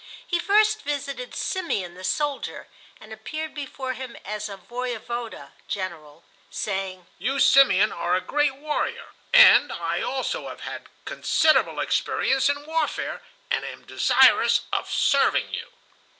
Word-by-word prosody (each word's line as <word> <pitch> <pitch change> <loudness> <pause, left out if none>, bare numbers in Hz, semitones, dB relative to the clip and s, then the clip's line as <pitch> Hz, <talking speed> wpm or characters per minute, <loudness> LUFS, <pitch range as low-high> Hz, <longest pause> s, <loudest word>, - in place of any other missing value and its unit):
He 345 - -1
first 425 +3 +3
visited 280 -3 -4
Simeon 205 - -2
the 185 +1 -12
soldier, 285 +8 -2 0.3
and 215 0 -11
appeared 310 +8 -6
before 270 -3 -5
him 255 -1 -8
as 210 0 -4
a 195 - -8
voyevoda 235 - -6 0.2
(general), 170 -6 -6 0.3
saying: 190 -2 -4
"You, 275 +2 -1
Simeon, 215 -9 +5
are 175 +1 -1
a - - +2
great 290 -2 0
warrior, 300 +2 -3 0.2
and 290 - +8
I 170 0 -2
also 260 +1 -3
have - - -10
had - - -7 0.2
considerable 310 -1 +2
experience 270 +1 +1
in 285 +1 -2
warfare, 320 +1 -2 0.3
and - - +1
am - - -8
desirous - - +4
of - - -1
serving - - +2
you." - - -4
255 Hz, 135 wpm, -24 LUFS, 195-290 Hz, 0.3 s, and